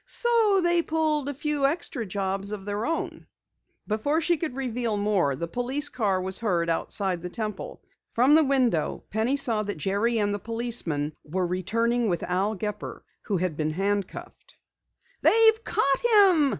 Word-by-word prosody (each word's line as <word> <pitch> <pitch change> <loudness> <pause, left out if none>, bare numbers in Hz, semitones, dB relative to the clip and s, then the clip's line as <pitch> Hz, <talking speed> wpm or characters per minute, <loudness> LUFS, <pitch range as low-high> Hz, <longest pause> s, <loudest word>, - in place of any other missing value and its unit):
So 450 -5 +3
they 345 0 +3
pulled 310 -3 0
a - - -3
few 290 0 0
extra 280 - -2
jobs 195 +1 -2
of 200 -2 -6
their 205 +2 -2
own." 325 0 -4 0.6
Before 225 +9 0
she 340 +1 +2
could 310 -5 -4
reveal 240 -4 -2
more, 200 -9 +1
the 170 +5 -4
police 255 - 0
car 200 -6 0
was 190 +1 -1
heard 175 -7 0
outside 180 +1 -1
the 180 - -5
Temple. 210 0 -6 0.3
From 255 +5 +4
the 315 +1 +6
window 255 - 0
Penny 225 +6 0
saw 230 -6 0
that 205 -3 -4
Jerry 205 +8 0
and 205 -1 +1
the 205 - -3
policeman 220 -10 -3
were 180 +4 -2
returning 225 +6 0
with 175 - -1
Al 195 +4 0
Gepper 210 +1 -5 0.2
who 200 - 0
had 175 -3 -2
been 155 0 -2
handcuffed. 200 +2 -4 0.7
"They've 445 0 +5
caught 275 -1 +1
him!" 390 -10 +5
220 Hz, 165 wpm, -26 LUFS, 190-285 Hz, 0.7 s, the